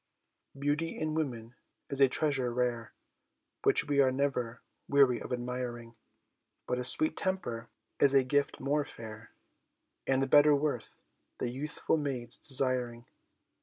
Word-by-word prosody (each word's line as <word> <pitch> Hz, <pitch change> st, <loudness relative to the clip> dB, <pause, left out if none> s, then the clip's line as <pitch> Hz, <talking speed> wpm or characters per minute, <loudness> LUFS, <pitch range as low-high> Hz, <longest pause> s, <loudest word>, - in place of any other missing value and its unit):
Beauty 145 Hz, +4 st, -2 dB
in 155 Hz, 0 st, -2 dB
woman 120 Hz, -7 st, -4 dB, 0.4 s
is 140 Hz, 0 st, -2 dB
a 135 Hz, -, +6 dB
treasure 135 Hz, -3 st, 0 dB
rare 120 Hz, -1 st, -2 dB, 0.7 s
Which -, -, +3 dB
we 140 Hz, -1 st, +3 dB
are 130 Hz, -1 st, +3 dB
never 125 Hz, -4 st, -2 dB, 0.2 s
weary 135 Hz, -4 st, +3 dB
of -, -, -8 dB
admiring; 120 Hz, -1 st, -5 dB, 0.7 s
But 125 Hz, -, -2 dB
a -, -, -2 dB
sweet 155 Hz, +6 st, +1 dB
temper 120 Hz, -12 st, -3 dB, 0.3 s
is 140 Hz, -1 st, +4 dB
a 135 Hz, -, +5 dB
gift 140 Hz, +2 st, 0 dB
more 145 Hz, +2 st, 0 dB
fair 110 Hz, -4 st, -11 dB, 0.8 s
And 135 Hz, 0 st, +1 dB
better 145 Hz, +2 st, +6 dB
worth 140 Hz, -5 st, -3 dB, 0.4 s
the 120 Hz, -, -3 dB
youthful 150 Hz, +4 st, -2 dB
maid's 135 Hz, -5 st, -3 dB
desiring. 125 Hz, -3 st, +4 dB
130 Hz, 130 wpm, -30 LUFS, 120-145 Hz, 0.8 s, a